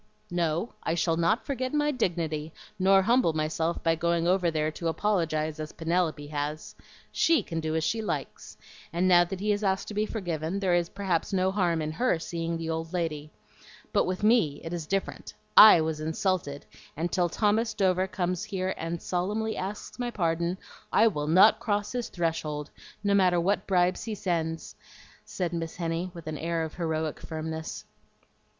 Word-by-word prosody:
"No, 175 +4 -1
I 165 - -1
shall 165 -1 +1
not 170 +8 +1
forget 260 0 -2
my 295 0 +2
dignity 165 - -2 0.3
nor 195 +1 +5
humble 235 -5 +3
myself 155 +2 -1
by 165 - +3
going 170 +1 0
over 180 -1 +3
there 155 -1 0
to 165 +2 -4
apologize 160 -4 0
as 155 0 -6
Penelope 165 -2 -1
has. 150 +1 -4 0.4
SHE 330 -1 +3
can 165 - -4
do 160 0 -2
as 160 - 0
she 225 +7 0
likes; 215 - -5 0.3
and 175 +2 +1
now 175 -1 +7
that 185 +1 -6
he 210 +2 0
has 205 +1 -1
asked 190 -1 0
to - - -6
be 210 +1 0
forgiven, 175 -3 -3
there 190 -3 +1
is 175 -1 +2
perhaps 190 -4 -1
no 190 -1 +2
harm 175 -5 +1
in 155 - -3
HER 240 +2 +1
seeing 165 0 -3
the 165 0 -5
old 160 +1 -3
lady. 155 -4 -2 0.6
But - - +3
with 185 +2 -3
me 210 -11 +3
it 165 - -5
is 165 -3 -4
different. 195 +2 -3 0.2
I 210 -6 +10
was 160 -1 -2
insulted, 160 -2 -2 0.3
and 170 +2 -2
till 175 -2 +1
Thomas 215 +4 +1
Dover 190 -2 +2
comes 180 -2 -2
here 190 -1 -2
and 165 +1 -3
solemnly 210 +6 -2
asks 200 +5 -6
my 245 -1 -1
pardon 170 -3 -1 0.3
I 220 - +5
will 150 -6 -3
NOT 185 +6 +6
cross 205 -2 -1
his 245 -2 -3
threshold, 155 -4 -2 0.3
no 200 -1 +2
matter 185 -3 +4
what 195 +4 0
bribes 180 +1 +2
he 220 -2 -3
sends," 165 -4 -2 0.5
said 180 -2 -3
Miss 165 -1 -4
Henny, 170 +1 -2
with 170 -2 -11
an 155 -1 -5
air 165 0 -1
of 160 - -5
heroic 160 -2 -2
firmness. 160 0 -5
170 Hz, 180 wpm, -28 LUFS, 160-195 Hz, 0.6 s, I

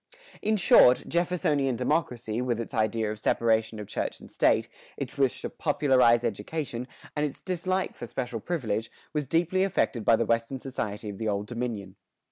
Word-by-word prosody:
In 215 0 +1
short, 125 -9 +6
Jeffersonian 160 -6 +1
democracy, 120 -3 -1
with 120 -2 -1
its 115 - -5
idea 110 -1 0
of 110 - -6
separation 110 0 +1
of 105 - -5
church - - -3
and - - -13
state, - - +3 0.3
its 135 0 -5
wish 135 -3 +1
to - - -2
popularize 125 -4 +3
education, 120 +3 -3 0.3
and 150 - 0
its 145 -2 -4
dislike 185 +1 -1
for 120 - -7
special 120 -1 -4
privilege, 115 -7 -2 0.2
was 150 -3 -1
deeply 175 +5 +2
affected 140 - 0
by 115 - +5
the - - 0
Western 115 +3 0
society 110 -5 -4
of 100 -2 -6
the 110 - -2
Old 100 -1 -1
Dominion. 110 -5 -5
120 Hz, 170 wpm, -28 LUFS, 110-150 Hz, 0.3 s, short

